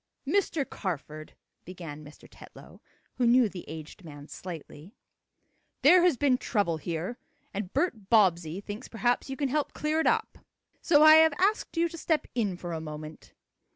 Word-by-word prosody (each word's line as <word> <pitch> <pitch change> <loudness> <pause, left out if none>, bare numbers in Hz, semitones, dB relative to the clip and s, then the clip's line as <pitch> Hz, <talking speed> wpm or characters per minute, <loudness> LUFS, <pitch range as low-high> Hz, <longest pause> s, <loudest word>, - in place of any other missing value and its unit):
"Mr. 335 -8 0
Carford," 155 -4 -6 0.3
began 165 -4 -9
Mr. 150 +1 -15
Tetlow, - - -15 0.4
who 245 - +3
knew 245 0 +5
the 190 -3 -9
aged 160 +4 -9
man 145 -3 -11
slightly, 170 - -10 0.9
"there 350 +5 +7
has 345 -6 +3
been 255 -1 +2
trouble 200 -8 0
here, 170 - -5 0.3
and 195 -2 -4
Bert 255 - -2
Bobbsey 180 -5 +3
thinks 205 +4 -8
perhaps 245 +3 -1
you 270 - -5
can 280 -1 -1
help 295 +2 -1
clear 305 +1 -1
it 320 - +1
up. 445 -1 0 0.4
So 300 -3 +5
I 310 0 +9
have 320 -1 +5
asked 390 -1 0
you 335 +1 +3
to 335 0 -9
step 315 -1 0
in 205 -7 -1
for 175 -1 -6
a 160 - -4
moment." 155 0 -9
210 Hz, 165 wpm, -28 LUFS, -, 0.9 s, I